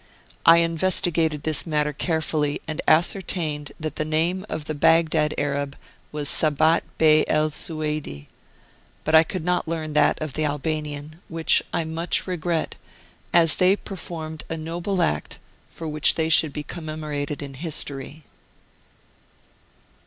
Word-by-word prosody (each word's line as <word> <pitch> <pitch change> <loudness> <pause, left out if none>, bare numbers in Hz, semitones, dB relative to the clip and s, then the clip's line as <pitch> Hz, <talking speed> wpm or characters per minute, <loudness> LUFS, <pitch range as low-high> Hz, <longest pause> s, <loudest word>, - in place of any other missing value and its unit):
I 165 +1 +9
investigated 165 -2 +1
this 155 +1 +2
matter 150 -1 0
carefully, 155 -2 -1
and 155 -1 -3
ascertained 155 -3 +1
that 155 -2 -5
the - - 0
name 165 +6 -1
of 155 - -4
the 155 - -3
Baghdad 155 0 +3
Arab 140 -1 -2 0.4
was 150 -1 -4
Sabat 155 +2 +3 0.2
Bey 155 -1 +5
El 155 0 +2
Sueidi, 150 - -3 0.8
but 155 - -1
I 160 - +9
could 165 +1 -4
not 180 -1 0
learn 160 -2 -3
that 150 -1 +3
of 155 -3 -4
the 155 - -1
Albanian, 150 +1 -3
which 165 -1 +2
I - - 0
much 165 +2 -2
regret, 175 -2 -2 0.5
as 165 -2 +4
they 185 +2 +5
performed 160 -6 -7
a 165 - -3
noble 175 +4 -2
act 75 0 -2 0.3
for 165 - -8
which 155 0 +3
they 160 -1 0
should 155 -1 +5
be 150 - -5
commemorated 150 -2 -5
in 140 -1 -8
history. 145 0 -3
155 Hz, 140 wpm, -24 LUFS, 150-165 Hz, 0.8 s, I